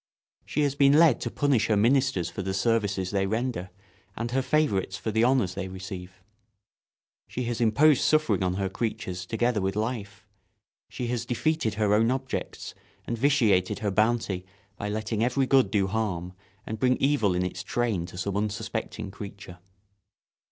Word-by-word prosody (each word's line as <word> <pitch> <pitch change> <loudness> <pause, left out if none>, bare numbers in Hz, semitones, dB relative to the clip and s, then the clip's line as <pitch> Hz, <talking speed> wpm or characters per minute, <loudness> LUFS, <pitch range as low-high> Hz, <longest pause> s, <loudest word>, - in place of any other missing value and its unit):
She 150 - -1
has 145 -2 +2
been 140 0 +5
led 155 -4 +5
to - - -2
punish 140 -7 +1
her 110 - +2
ministers 125 -5 +2
for 85 +3 -5
the 95 0 -3
services 100 -3 0
they 95 -1 +1
render 110 -3 -2 0.5
and 115 +1 -3
her 135 +1 +1
favourites 130 -11 0
for 110 - -3
the 110 +2 +2
honours 120 -7 +2
they 95 0 -4
receive. 95 0 -8 1.0
She 125 - -4
has 120 -1 -3
imposed 130 +6 +4
suffering 155 -12 +2
on 90 -1 0
her 95 0 -1
creatures 95 -3 -4
together 115 0 0
with 95 +1 -1
life; 105 -3 -4 0.6
she 125 - -5
has 120 -1 -1
defeated 125 -1 0
her 105 -1 +2
own 110 +2 +4
objects 130 0 -4 0.3
and 120 - -2
vitiated 115 -8 +2
her 100 - +1
bounty 110 -3 +1 0.3
by 105 - -4
letting 110 +1 -2
every 125 +3 +2
good 135 0 +4
do 100 -3 +2
harm 95 -4 -2 0.3
and 110 0 -5
bring 125 +1 +3
evil 125 -10 +2
in 90 +1 0
its 90 - -4
train 110 -8 -1
to 90 - -11
some 95 +1 -2
unsuspecting 100 -1 -3
creature. 100 -2 -9
110 Hz, 165 wpm, -27 LUFS, 95-125 Hz, 1.0 s, been